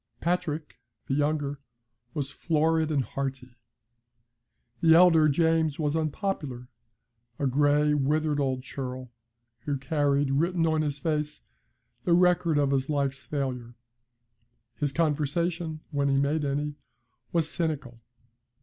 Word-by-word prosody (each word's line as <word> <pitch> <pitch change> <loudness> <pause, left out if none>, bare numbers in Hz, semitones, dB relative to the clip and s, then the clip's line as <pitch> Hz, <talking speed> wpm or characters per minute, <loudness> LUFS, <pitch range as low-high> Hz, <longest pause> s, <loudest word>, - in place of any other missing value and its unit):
Patrick, 165 -3 -2 0.3
the - - -2
younger, 145 -1 0 0.6
was 140 -2 -2
florid 160 0 +1
and 145 -4 +1
hearty; 130 -2 -5 1.2
the 160 -1 +6
elder, 165 -3 +6
James, 160 0 +2
was 150 -1 0
unpopular 155 -6 -3 0.7
a 145 - -1
gray, 145 +2 +3
withered 150 +1 +1
old 130 -2 -1
churl, 130 -2 -6 0.5
who 140 +4 -2
carried 140 -1 +1
written 165 +4 +1
on 160 -1 +2
his 145 -2 -2
face 150 0 -2 0.6
the 175 - +2
record 175 -2 +3
of 140 -1 +2
his 135 0 0
life's 140 -2 -1
failure. 125 -5 -4 1.0
His 145 +3 -2
conversation, 160 +2 -1
when 140 -1 +1
he 135 - +2
made 145 +2 +1
any, 145 +1 -2 0.5
was 165 -2 +1
cynical. 145 -9 -3
150 Hz, 120 wpm, -27 LUFS, 140-160 Hz, 1.2 s, the